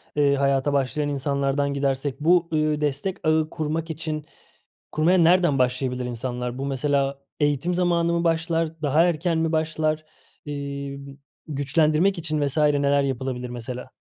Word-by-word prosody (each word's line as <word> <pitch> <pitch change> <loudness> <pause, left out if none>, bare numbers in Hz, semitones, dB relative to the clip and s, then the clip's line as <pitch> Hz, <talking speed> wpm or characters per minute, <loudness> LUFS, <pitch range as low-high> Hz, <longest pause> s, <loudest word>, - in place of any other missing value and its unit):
eee, 145 -1 +3
hayata 140 +1 +1
başlayan 145 +2 0
insanlardan 140 0 0
gidersek 140 0 -1
bu, 170 +2 +3
ııı, 155 -1 +1
destek 150 +6 -1
ağı 155 0 +2
kurmak 160 +1 -3
için 155 -1 -4 0.7
kurmaya 165 +5 +3
nereden 170 -4 +4
başlayabilir 125 0 0
insanlar? 125 0 -4
Bu 135 - -3
mesela 140 0 0 0.2
eğitim 145 +4 +1
zamanı 170 -1 +1
mı 170 0 0
başlar, 165 -1 0
daha 150 +3 +3
erken 170 0 0
mi 160 0 0
başlar, 155 -1 0 0.4
eee, 140 -1 -5 0.5
güçlendirmek 155 +5 +2
için 155 -2 -2
vs. 140 +3 -4
neler 145 -2 +3
yapılabilir 130 -2 -3
mesela? 125 +1 -6
145 Hz, 135 wpm, -24 LUFS, 140-160 Hz, 0.7 s, nereden